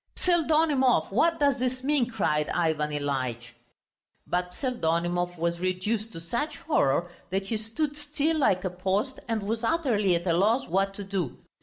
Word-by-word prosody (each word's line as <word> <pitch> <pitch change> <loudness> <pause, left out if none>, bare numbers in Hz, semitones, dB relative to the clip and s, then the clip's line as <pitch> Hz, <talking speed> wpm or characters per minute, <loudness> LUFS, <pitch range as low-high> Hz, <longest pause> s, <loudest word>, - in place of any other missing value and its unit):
"Pseldonimov, 305 - +2
what 330 +11 +2
does 280 -3 +3
this 255 0 -2
mean?" 275 -4 +2
cried 150 -10 0
Ivan 160 -3 0
Ilyitch. 130 -5 -3 0.7
But 180 0 -1
Pseldonimov 175 - -1
was 170 +1 -1
reduced 200 +5 -1
to 165 - -6
such 235 - -3
horror 175 - +1 0.2
that 190 +1 -1
he 220 +3 -1
stood 280 +8 -3
still 295 +2 -1
like 190 -10 +2
a 185 - -1
post 195 +8 -1
and 225 -3 -1
was 225 +3 -2
utterly 230 - +2
at 170 +1 -2
a 170 - +2
loss 215 +9 +2
what 195 +3 0
to 205 - -5
do. 190 -9 -3
200 Hz, 160 wpm, -27 LUFS, 175-260 Hz, 0.7 s, does